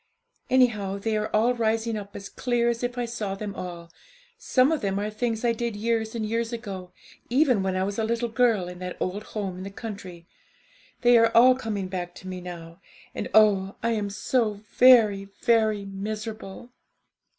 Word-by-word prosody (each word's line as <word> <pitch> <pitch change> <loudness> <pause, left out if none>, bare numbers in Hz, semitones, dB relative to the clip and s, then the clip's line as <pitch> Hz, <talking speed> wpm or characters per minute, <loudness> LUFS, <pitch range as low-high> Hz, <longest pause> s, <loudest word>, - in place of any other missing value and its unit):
Anyhow, 215 -7 +2
they 220 +2 -1
are 215 0 0
all 230 +4 +2
rising 225 -1 0
up 200 -1 -7
as 200 - -7
clear 240 -1 0
as 235 -1 -2
if 245 0 -3
I 245 - -1
saw 215 -4 -4
them 200 0 -5
all; 170 -3 -7 0.4
some 280 - +2
of 315 - 0
them 195 -1 -1
are 210 +1 -2
things 225 +1 -2
I 235 - +4
did 230 -1 -3
years 220 +1 -1
and 220 -2 -2
years 230 +2 -1
ago, 195 -6 -6 0.4
even 250 -4 +3
when 190 -1 -1
I 185 - +1
was 200 +2 -3
a - - +1
little 235 +2 0
girl 225 -6 +2
in 180 0 -9
that 180 0 -6
old 190 +3 -2 0.2
home 195 -3 -3
in - - -6
the 195 - -6
country; 195 -5 -8 0.8
they 240 -1 +6
are 230 0 +5
all 255 +2 +8
coming 210 -7 -4
hack 175 -1 -4
to 190 - -11
me 185 -1 -5
now, 170 0 -9 0.3
and - - -4
oh, 200 -3 +4
I 230 - +1
am 210 -3 -1
so 215 +2 0 0.2
very, 220 -6 +6 0.2
very 220 -3 +2
miserable!' 215 +2 -6
215 Hz, 190 wpm, -26 LUFS, 195-235 Hz, 0.8 s, all